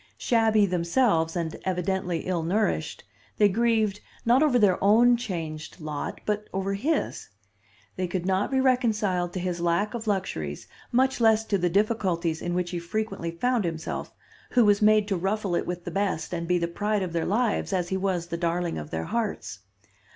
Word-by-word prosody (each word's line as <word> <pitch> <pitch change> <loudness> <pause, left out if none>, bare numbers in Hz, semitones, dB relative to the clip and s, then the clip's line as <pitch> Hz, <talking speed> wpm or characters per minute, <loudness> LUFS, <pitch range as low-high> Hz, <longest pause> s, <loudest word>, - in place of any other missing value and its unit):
Shabby 220 -3 +3
themselves, 170 -1 +1
and 165 -2 -2
evidently 180 -1 -1
ill 180 -2 -1
nourished, 200 +6 -1 0.3
they 210 - +6
grieved 220 -1 +1 0.3
not 245 +4 +5
over 295 -5 +4
their 200 -6 +3
own 235 +4 +6
changed 165 -9 -5
lot, 155 -2 -5
but 210 0 -1
over 195 +1 -2
his. 285 +10 -1 0.7
They 185 -1 -1
could 175 0 -3
not 190 +1 +1
be 265 - +1
reconciled 215 -9 +1
to 185 - -3
his 175 -1 -3
lack 175 +5 +1
of 230 -2 -5
luxuries, 80 - -2 0.2
much 260 +1 +2
less 220 -1 +4
to 200 - +1
the 175 0 +1
difficulties 180 -5 0
in 175 0 -2
which 180 -1 -1
he 175 - -2
frequently 195 -1 -3
found 240 +7 0
himself, 165 -2 -4 0.4
who 245 -2 +5
was 205 0 +4
made 215 -1 +5
to 200 - 0
ruffle 195 +1 -1
it - - 0
with 175 -1 -4
the - - -4
best 195 -4 -1
and 170 -1 -3
be 180 0 +2
the 170 -1 0
pride 205 +3 -1
of 175 -2 -4
their 165 -1 -1
lives 220 +2 0
as 180 -2 -1
he 190 - -1
was 185 -3 -1
the 170 0 -4
darling 170 - -1
of 75 0 -8
their 80 0 -3
hearts. 205 - -3
190 Hz, 185 wpm, -26 LUFS, 170-215 Hz, 0.7 s, they